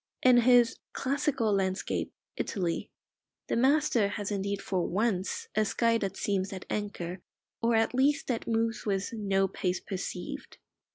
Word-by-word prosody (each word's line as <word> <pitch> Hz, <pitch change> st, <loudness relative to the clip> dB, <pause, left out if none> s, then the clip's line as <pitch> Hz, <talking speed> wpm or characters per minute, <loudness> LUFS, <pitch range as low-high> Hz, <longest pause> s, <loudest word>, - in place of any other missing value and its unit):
In 255 Hz, -1 st, +7 dB
his 240 Hz, -1 st, +5 dB, 0.2 s
"Classical 270 Hz, -5 st, 0 dB
Landscape: 190 Hz, -1 st, -1 dB, 0.2 s
Italy," 175 Hz, -5 st, -2 dB, 0.6 s
the -, -, -1 dB
master 260 Hz, -3 st, +3 dB
has 205 Hz, 0 st, -4 dB
indeed 200 Hz, 0 st, -1 dB
for 185 Hz, -3 st, -1 dB
once 200 Hz, -1 st, -1 dB
a 215 Hz, -, +3 dB
sky 230 Hz, +2 st, +2 dB
that 195 Hz, -2 st, -3 dB
seems 195 Hz, -1 st, -1 dB
at 190 Hz, -2 st, -7 dB
anchor, 185 Hz, -4 st, -3 dB, 0.4 s
or 230 Hz, 0 st, +3 dB
at 225 Hz, +2 st, +2 dB
least 290 Hz, +4 st, +2 dB
that 240 Hz, -3 st, -2 dB
moves 225 Hz, 0 st, 0 dB
with 195 Hz, +1 st, -1 dB
"no 195 Hz, -3 st, +1 dB
pace 180 Hz, -1 st, -2 dB
perceived." 195 Hz, +8 st, -6 dB
210 Hz, 145 wpm, -29 LUFS, 195-235 Hz, 0.6 s, In